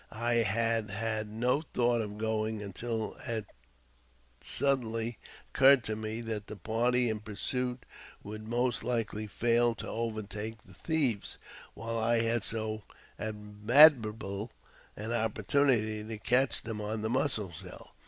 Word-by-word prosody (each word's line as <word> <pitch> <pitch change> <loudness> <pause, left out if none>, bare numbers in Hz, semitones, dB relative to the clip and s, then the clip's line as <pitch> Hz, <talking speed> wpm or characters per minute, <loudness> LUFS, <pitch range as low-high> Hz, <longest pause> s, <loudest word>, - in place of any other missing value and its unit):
I 120 +2 0
had 115 0 +1
had 110 +1 -2
no 125 +6 +1
thought 120 -6 +1
of 105 -1 -6
going 110 -1 -1
until 110 +3 -4
it 110 -2 -2 1.0
suddenly 120 -4 0 0.3
occurred 135 -1 +6
to 110 - -2
me 110 +1 -4
that 110 -3 -4
the - - -7
party 120 +5 +1
in 110 -1 -1
pursuit 125 +4 -2 0.4
would 110 +1 -8
most 120 +1 0
likely 110 -3 -2
fail 120 +2 +2
to - - -6
overtake 110 -1 -4
the^l - - -17
thieves, 140 -11 -1 0.4
while 115 +1 -3
I 115 +1 +2
had 115 -1 +1
so 110 -1 -2 0.4
admirable 110 0 +4 0.5
an 110 +2 -4
opportunity 110 0 +1
to 110 0 -6
catch 125 +4 +2
them 110 -2 -4
" - - -6
• - - -4
on 105 +1 -3
the 110 - -1
Mussel 120 -7 0
Shell. 75 - -11
110 Hz, 140 wpm, -31 LUFS, 110-120 Hz, 1.0 s, occurred